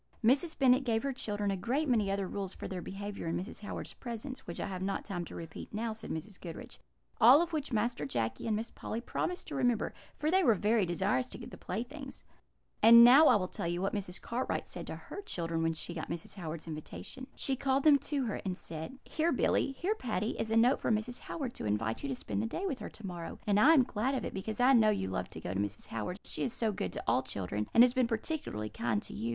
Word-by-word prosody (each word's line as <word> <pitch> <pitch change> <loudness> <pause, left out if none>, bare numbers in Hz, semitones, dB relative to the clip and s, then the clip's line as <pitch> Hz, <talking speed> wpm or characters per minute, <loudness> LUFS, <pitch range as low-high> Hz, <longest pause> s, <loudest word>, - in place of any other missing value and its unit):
"Mrs. 280 +8 +3
Bennet 260 0 +5
gave 225 -3 0
her 275 -1 -1
children 205 -5 -1
a - - 0
great 255 +11 0
many 220 -6 +2
other 195 -1 -1
rules 195 0 -4
for - - -6
their 185 -2 -4
behaviour 200 0 -6
in 165 - 0
Mrs. 190 +5 -6
Howard's 205 - -6
presence, 245 +2 -7
which 170 - -5
I - - -1
have 185 -2 -5
not 195 +1 -2
time 175 -3 -3
to - - -10
repeat 165 -2 -8
now," 220 +1 -2
said 220 0 -8
Mrs. 180 +5 -6
Goodriche; 165 -3 -8 0.4
"all 250 +6 +9
of 340 0 -1
which 295 -3 -2
Master 230 -4 0
Jacky 115 - -2
and 220 - +2
Miss 225 +2 -3
Polly 225 - -5
promised 355 +8 -3
to - - -6
remember, 245 -4 +1 0.2
for 305 +1 0
they 380 +1 +4
were 230 -8 +5
very 210 0 +2
desirous 195 +9 0
to - - -7
get 235 - -9
the - - -8
playthings. 270 +8 -6 0.6
"And 235 +1 +10
now 270 +6 +9
I 245 - +7
will 185 -3 +1
tell 170 - -4
you 175 +1 -1
what 195 +2 -1
Mrs. 190 -4 -3
Cartwright 245 +2 -2
said - - -6
to - - -4
her 400 - -8
children 165 - -2
when 165 0 +1
she 165 +2 -4
got 160 - -5
Mrs. 170 - -5
Howard's 165 -4 -6
invitation. 165 - -7
She 270 - 0
called 270 +1 +1
them 295 -2 +7
to 280 -2 -1
her, 215 - -3
and 185 -2 -2
said: 160 +10 -7
"'Here, 325 +2 0
Billy 270 +1 +2
here, 355 +10 0
Patty, 225 - -2
is 220 - -1
a 225 - +2
note 245 +4 +5
from 220 - +2
Mrs. 235 +3 -3
Howard 270 -7 -5
to - - -6
invite 110 +2 -1
you 140 - -3
to 135 - -1
spend 100 -4 -3
the 110 - -1
day 380 - -3
with 280 -10 -2
her - - -6
to 220 - -11
morrow; 175 -3 -6
and 205 -1 +3
I 310 +9 +7
am 270 - +6
glad 245 +4 -1
of 260 - -2
it, - - -4
because 215 +4 -4
I 255 +2 +6
know 220 -4 +6
you 150 - 0
love 95 - -3
to - - -8
go 90 - -4
to 95 - -1
Mrs. 100 0 -3
Howard's, 115 - -5
she - - -3
is 245 - -1
so 225 -2 0
good 95 - -3
to - - -5
all - - +3
children, 100 +2 -3
and 235 - +8
has 245 -1 +4
been 255 -2 +2
particularly 225 - -3
kind 110 0 -1
to - - -7
you. 110 +3 -3
215 Hz, 255 wpm, -32 LUFS, 175-255 Hz, 0.6 s, And